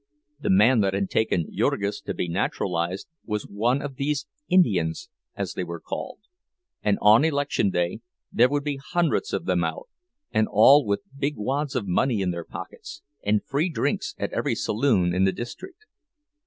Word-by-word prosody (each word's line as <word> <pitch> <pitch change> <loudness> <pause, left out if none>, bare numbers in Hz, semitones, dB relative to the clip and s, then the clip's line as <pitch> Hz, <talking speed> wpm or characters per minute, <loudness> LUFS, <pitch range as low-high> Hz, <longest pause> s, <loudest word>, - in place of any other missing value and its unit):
The - - -2
man 110 +6 +5
that 95 -2 +1
had 100 -1 -1
taken 90 -7 0
Jurgis 100 +1 0
to - - -5
be - - -2
naturalized 90 0 -2 0.2
was 105 -2 -3
one 120 +7 0
of 140 -3 -6
these 145 0 -1 0.2
"Indians," 95 - +2 0.3
as - - -3
they 90 - -3
were 85 -1 -6
called; - - -6 0.6
and 105 -1 +2
on 110 +6 +7
election 145 -9 +1
day 90 +2 -1 0.3
there 120 +2 +4
would 145 +1 -1
be 145 -2 -3
hundreds 175 - +1
of - - -2
them - - +1
out, - - -4 0.4
and 110 0 +2
all 135 +8 +7
with 100 0 0
big 145 +1 -1
wads 135 +6 -2
of 120 -5 -1
money 110 +5 +1
in 90 -2 0
their 85 -1 -5
pockets 430 -6 -9 0.2
and 105 0 +1
free 150 +6 0
drinks 160 - -2
at - - -3
every - - 0
saloon 105 -7 +1
in 90 +1 +2
the 95 - +3
district. 330 - -8
110 Hz, 175 wpm, -25 LUFS, 95-145 Hz, 0.6 s, on